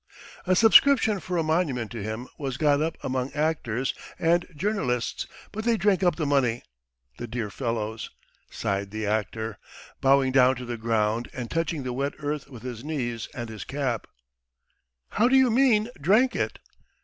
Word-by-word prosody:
"A 185 - +4
subscription 225 0 +6
for 180 -1 -3
a 165 - +2
monument 155 - 0
to 115 -3 -5
him 110 +4 -5
was 135 -3 -3
got 145 -1 +3
up 160 +1 -1
among 130 0 -2
actors 145 -5 -1 0.2
and 170 +1 +2
journalists, 145 - -1 0.2
but 220 +1 -5
they 230 0 +2
drank 200 -3 +2
up 175 -4 +3
the 155 - -2
money, 130 -5 +1 0.6
the 120 - -5
dear 115 -3 -4
fellows.. 110 -3 -3 0.2
." - - -38
sighed 100 0 -2
the 110 +1 -4
actor, 110 +1 -2 0.4
bowing 135 -1 +4
down 130 0 +5
to 125 0 -7
the 120 0 -4
ground 115 0 0
and 125 -2 -6
touching 165 -3 -1
the 125 -1 -3
wet 140 +3 -1
earth 145 -1 -4
with 125 -4 -11
his 125 -2 -6
knees 120 -7 -3
and 120 -2 -4
his 110 -3 -7
cap. 130 -6 -2 1.0
"How 235 - +3
do 260 - +4
you 260 -2 +5
mean, 230 -3 +4
drank 215 - +4
it?" - - -1
135 Hz, 175 wpm, -26 LUFS, 115-170 Hz, 1.0 s, subscription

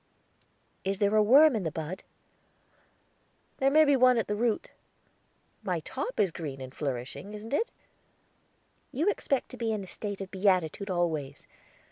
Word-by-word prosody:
"Is 195 +1 -1
there 205 +1 +2
a 215 - +6
worm 275 +6 +7
i' - - +1
the 175 -5 -2
bud?" 160 +4 -5 1.6
"There 270 - +3
may 310 +2 +6
be 285 -1 +4
one 255 -1 +5
at 225 - +1
the 210 - -2
root; 225 0 -1 0.9
my - - -1
top - - -5
is 190 - +3
green 145 -5 -6
and 130 0 -8
flourishing, 140 +9 -5
isn't 220 +4 -8
it?" 450 - +1 1.2
"You 325 +11 +2
expect 275 -9 -1
to 255 - -10
be 230 -2 -2
in 210 -2 -2
a - - -10
state 205 +2 -5
of 195 -1 -7
beatitude 190 -1 +1
always. 160 -6 -2
205 Hz, 160 wpm, -29 LUFS, 170-245 Hz, 1.6 s, worm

